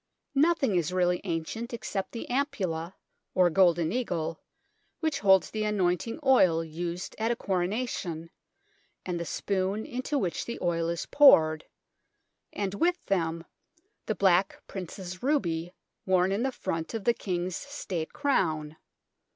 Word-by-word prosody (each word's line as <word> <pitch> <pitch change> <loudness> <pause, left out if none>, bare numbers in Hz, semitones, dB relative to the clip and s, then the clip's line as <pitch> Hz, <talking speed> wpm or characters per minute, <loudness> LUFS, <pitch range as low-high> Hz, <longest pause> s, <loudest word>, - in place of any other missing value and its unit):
Nothing 285 - +3
is 170 0 0
really 180 -1 +1
ancient 195 +8 -3
except 195 -4 -4
the 230 - -6
Am 275 +3 +1
pulla, 180 - -4 0.4
or 180 -2 +4
Golden 170 -2 +4
Eagle, 175 -9 -2 0.6
which 315 -3 0
holds 190 -3 +4
the 215 -1 -2
anointing 210 - 0
oil 185 -11 +5
used 170 +3 -5
at 225 +1 +1
a 240 - +1
Coronation, 180 -4 -2 0.7
and 180 -2 -2
the 170 - -3
Spoon 195 +4 -1
into 255 +4 -2
which 180 -10 -1
the 235 - -5
oil 170 -2 0
is 170 0 -2
poured, 155 - +6 0.9
and 200 -2 -3
with 345 - +2
them 165 -3 -1 0.6
the 215 - 0
Black 190 0 +2
Prince's 185 -1 -7
ruby 175 - 0 0.4
worn 185 0 +3
in 200 +3 0
the 265 +1 0
front 165 -4 -4
of 220 - -3
the 235 - +4
King's 180 -4 -3
State 190 - -5
Crown. 160 - 0
185 Hz, 140 wpm, -28 LUFS, 170-230 Hz, 0.9 s, poured